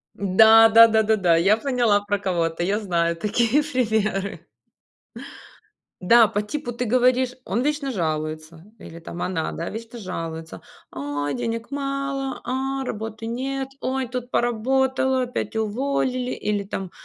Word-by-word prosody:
Да 220 Hz, +3 st, +6 dB
да 230 Hz, +1 st, +8 dB
да 220 Hz, -1 st, +2 dB
да 220 Hz, +1 st, +3 dB
да, 175 Hz, -4 st, +3 dB
я 195 Hz, +5 st, +4 dB
поняла 240 Hz, -5 st, +1 dB
про 205 Hz, 0 st, -1 dB
кого 175 Hz, -4 st, 0 dB
ты, 165 Hz, +1 st, -4 dB
я 200 Hz, +4 st, 0 dB
знаю 170 Hz, -5 st, 0 dB
такие 225 Hz, -, +1 dB
примеры. 220 Hz, -8 st, -1 dB, 1.6 s
Да, 230 Hz, +5 st, +6 dB
по 205 Hz, -1 st, -1 dB
типу 260 Hz, +5 st, -5 dB
ты 240 Hz, +1 st, -3 dB
говоришь, 250 Hz, +1 st, +2 dB
он 215 Hz, +3 st, -1 dB
вечно 290 Hz, 0 st, -1 dB
жалуется, 155 Hz, -3 st, -4 dB, 0.2 s
или 165 Hz, -3 st, -11 dB
там 170 Hz, +1 st, -8 dB
она, 175 Hz, -4 st, -2 dB
да, 170 Hz, -, -5 dB
вечно 230 Hz, +2 st, -8 dB
жалуется: 165 Hz, -4 st, -6 dB, 0.3 s
"Ой, 145 Hz, +1 st, -3 dB
денег 230 Hz, 0 st, -4 dB
мало, 275 Hz, -1 st, -3 dB
а, 265 Hz, +2 st, -2 dB
работы 220 Hz, 0 st, -6 dB
нет! 265 Hz, +3 st, -3 dB
Ой, 260 Hz, 0 st, -2 dB
тут 250 Hz, 0 st, -6 dB
поработала, 260 Hz, +2 st, +1 dB
опять 245 Hz, -2 st, -4 dB
уволили!" 250 Hz, +3 st, -1 dB
Или 210 Hz, -1 st, -2 dB
там: 190 Hz, -2 st, -6 dB
225 Hz, 145 wpm, -23 LUFS, 190-255 Hz, 1.6 s, да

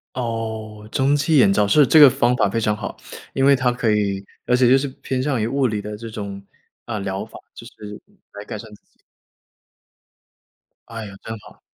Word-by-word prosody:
哦， 110 Hz, -3 st, -5 dB
蒸 140 Hz, +1 st, +2 dB
汽 150 Hz, +2 st, +2 dB
眼 105 Hz, -7 st, +5 dB
罩， 105 Hz, 0 st, +2 dB
是， 145 Hz, +7 st, +5 dB
这 155 Hz, -, +5 dB
个 145 Hz, -, +10 dB
方 120 Hz, 0 st, +1 dB
法 100 Hz, -, +2 dB
非 115 Hz, -, -1 dB
常 105 Hz, -1 st, 0 dB
好。 105 Hz, -, -7 dB, 0.4 s
因 135 Hz, -, +1 dB
为 140 Hz, 0 st, +6 dB
它 125 Hz, -2 st, +1 dB
可 120 Hz, -3 st, 0 dB
以 100 Hz, -2 st, -1 dB, 0.2 s
而 125 Hz, -, +4 dB
且 125 Hz, -1 st, +4 dB
就 130 Hz, -, +6 dB
是 140 Hz, -, -2 dB
偏 130 Hz, -1 st, -2 dB
向 135 Hz, -3 st, -1 dB
于 110 Hz, -, 0 dB
物 135 Hz, +2 st, +1 dB
理 105 Hz, -3 st, -3 dB
的 105 Hz, +1 st, -6 dB
这 115 Hz, +2 st, -8 dB
种， 100 Hz, -3 st, -7 dB, 0.4 s
啊， 115 Hz, -2 st, -4 dB
疗 100 Hz, 0 st, -3 dB
法， -, -, -12 dB, 0.2 s
就 -, -, -12 dB
是 105 Hz, 0 st, -10 dB, 0.3 s
来 100 Hz, -, -8 dB
改 110 Hz, -, -6 dB
善 110 Hz, +1 st, -11 dB
自 105 Hz, -, -17 dB
己。 -, -, -39 dB, 1.9 s
哎 115 Hz, -1 st, -7 dB
呀， 100 Hz, -, -10 dB
真 110 Hz, 0 st, -6 dB
好。 -, -, -17 dB
115 Hz, 225 characters per minute, -21 LUFS, 105-130 Hz, 1.9 s, 个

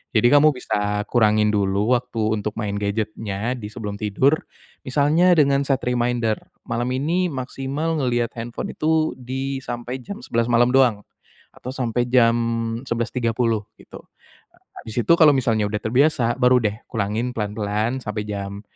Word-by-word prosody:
Jadi, 110 Hz, +2 st, +5 dB
kamu 150 Hz, +1 st, +6 dB
bisa 105 Hz, -4 st, -1 dB
kurangin 110 Hz, -2 st, +3 dB
dulu 100 Hz, +3 st, +1 dB
waktu 120 Hz, -2 st, -5 dB, 0.2 s
untuk 105 Hz, +1 st, -4 dB
main 105 Hz, -2 st, -2 dB
gadget-nya 105 Hz, +1 st, -2 dB
di 105 Hz, -4 st, -7 dB
sebelum 105 Hz, -3 st, -6 dB
tidur. 110 Hz, +8 st, +2 dB, 0.5 s
Misalnya 150 Hz, +7 st, +3 dB
dengan 140 Hz, -2 st, +4 dB
set 135 Hz, -2 st, +1 dB
reminder 120 Hz, -2 st, 0 dB, 0.3 s
"Malam 120 Hz, +1 st, -1 dB
ini 165 Hz, +8 st, 0 dB
maksimal 135 Hz, +5 st, -3 dB
ngelihat 120 Hz, -3 st, 0 dB
handphone 115 Hz, +1 st, -5 dB
itu 160 Hz, 0 st, +1 dB
di 135 Hz, +2 st, -4 dB
sampai 120 Hz, +1 st, -5 dB
jam 200 Hz, -, -8 dB
11.00 115 Hz, -, 0 dB
malam 120 Hz, +1 st, +4 dB
doang 125 Hz, -6 st, +4 dB, 0.5 s
atau 125 Hz, -, -8 dB
sampai 120 Hz, -2 st, -1 dB
jam 120 Hz, -2 st, +4 dB, 0.5 s
11:30," 115 Hz, -2 st, -1 dB
gitu. -, -, -13 dB, 0.8 s
Habis 115 Hz, +2 st, -3 dB
itu -, -, +4 dB
kalau 160 Hz, -3 st, +6 dB
misalnya 115 Hz, -5 st, +1 dB
udah 105 Hz, -, -2 dB
terbiasa, 125 Hz, -1 st, +2 dB
baru 125 Hz, 0 st, +5 dB
deh 105 Hz, -2 st, +1 dB, 0.2 s
kurangin 110 Hz, +3 st, -2 dB
pelan-pelan 105 Hz, +3 st, -2 dB
sampai 105 Hz, -1 st, -4 dB
jam, 100 Hz, 0 st, -5 dB
120 Hz, 145 wpm, -22 LUFS, 105-130 Hz, 0.8 s, kamu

